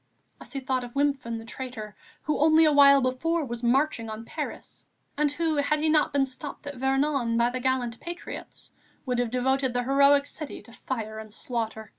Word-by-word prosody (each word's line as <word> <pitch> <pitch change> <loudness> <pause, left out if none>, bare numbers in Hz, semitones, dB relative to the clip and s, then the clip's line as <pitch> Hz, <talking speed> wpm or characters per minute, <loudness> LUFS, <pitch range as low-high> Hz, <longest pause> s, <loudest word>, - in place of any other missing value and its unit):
And - - -12
he 275 - -3
thought 260 -1 -1
of 245 +1 -9
Wimpfen, 275 -5 0
the 225 - -9
traitor, 230 -4 -7 0.3
who 305 - -1
only 315 +2 +6
a 305 - +5
while 280 -1 +7
before 310 +6 0
was 240 -2 -6
marching 245 -1 +1
on 220 +1 -7
Paris, - - -7 0.3
and 295 0 +1
who, 315 0 -1
had 290 +1 +2
he 310 +1 +1
not 305 -1 +3
been 280 -1 +2
stopped 270 +2 -9
at 285 -2 -6
Vernon, 265 -2 +1
by 235 +1 +3
the 255 - -3
gallant 250 -2 -1
patriots, 345 +1 -8 0.3
would 250 -2 -1
have 245 -1 0
devoted 260 +1 +1
the 245 - +1
heroic 280 +2 +4
city 295 0 -7
to 235 - -16
fire 220 -4 -5
and 220 -1 -10
slaughter. 225 -1 -4
265 Hz, 195 wpm, -27 LUFS, 240-285 Hz, 0.3 s, while